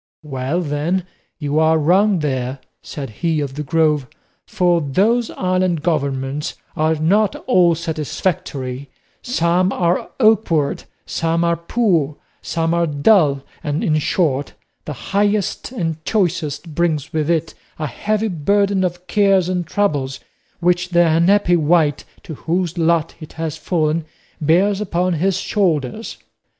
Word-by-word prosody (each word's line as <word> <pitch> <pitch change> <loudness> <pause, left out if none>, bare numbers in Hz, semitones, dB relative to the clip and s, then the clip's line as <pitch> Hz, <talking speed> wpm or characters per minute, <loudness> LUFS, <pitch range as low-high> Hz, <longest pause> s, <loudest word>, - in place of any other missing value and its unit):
"Well, 140 +3 -2
then, 165 +4 -1 0.3
you 150 0 -1
are 160 0 +4
wrong 185 +6 +3
there," 130 -2 -2 0.2
said 135 -6 -7
he 165 -3 +1
of 140 -2 -3
the 150 - -5
Grove; 150 -2 +1 0.4
"for 175 -2 +2
those 210 - +1
island 185 -3 0
governments 140 -3 -1 0.2
are 155 +1 +2
not 190 +7 +2
all 180 -9 +4
satisfactory; 150 -4 -3 0.3
some 180 -5 +1
are 175 -1 0
awkward, 215 - +2 0.2
some 165 +1 0
are 170 0 +2
poor, 170 -5 0 0.2
some 165 0 -1
are 170 0 +2
dull, 145 -2 +3 0.2
and, 150 +1 -2
in 155 -1 +2
short, 145 -4 0 0.3
the 150 - -4 0.2
highest 205 +2 0
and 165 -9 -3
choicest 165 -6 -1
brings 160 -2 -1
with 155 0 0
it 165 -1 0 0.2
a 155 - -3
heavy 215 +8 -1
burden 200 +2 +1
of 180 0 -3
cares 195 -3 +3
and 180 -3 -2
troubles 145 -7 -1 0.4
which 180 +1 +1
the 175 -1 +4
unhappy 175 +3 +3
wight 155 -2 +2 0.2
to 160 - -7
whose 170 +3 -2
lot 165 -1 +1
it 155 - -11
has 160 -2 -4
fallen 160 -1 -1 0.4
bears 190 +7 +3
upon 180 -2 0
his 180 +4 +1
shoulders. 185 - -1
165 Hz, 135 wpm, -19 LUFS, 150-185 Hz, 0.4 s, are